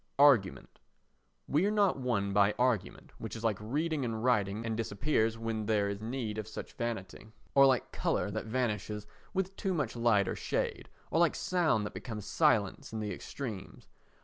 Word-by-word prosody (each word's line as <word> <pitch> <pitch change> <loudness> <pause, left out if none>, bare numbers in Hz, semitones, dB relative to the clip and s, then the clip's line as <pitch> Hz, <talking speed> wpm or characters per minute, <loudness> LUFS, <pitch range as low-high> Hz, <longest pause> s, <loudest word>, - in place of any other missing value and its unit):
Argument 135 -9 +4 0.7
We 150 +5 +2
are - - +2
not 205 -7 +2
won 105 -6 0
by 100 +1 +4
argument, 125 -5 0
which - - -6
is 115 - -7
like 110 -4 +1
reading 150 +6 -1
and 115 -2 -3
writing 110 -3 +1
and 110 -1 -1
disappears 115 +1 0
when 115 -2 -3
there 105 -2 +2
is 100 +1 -4
need 110 -2 -3
of 110 - -5
such 110 - -7
vanity, 115 -4 -4 0.3
or 140 0 +7
like 130 -4 +1
colour - - 0
that - - -4
vanishes 105 -3 -2 0.3
with 190 0 -2
too 190 -2 -1
much 140 -8 -1
light 115 -5 +3
or - - -1
shade, - - -2 0.2
or 165 - +2
like 170 -2 +4
sound 165 - +1
that - - -6
becomes 105 -5 -6
silence 110 - +2
in 110 - -4
the 105 -2 -3
extremes. 110 0 -7
115 Hz, 175 wpm, -32 LUFS, 105-135 Hz, 0.7 s, or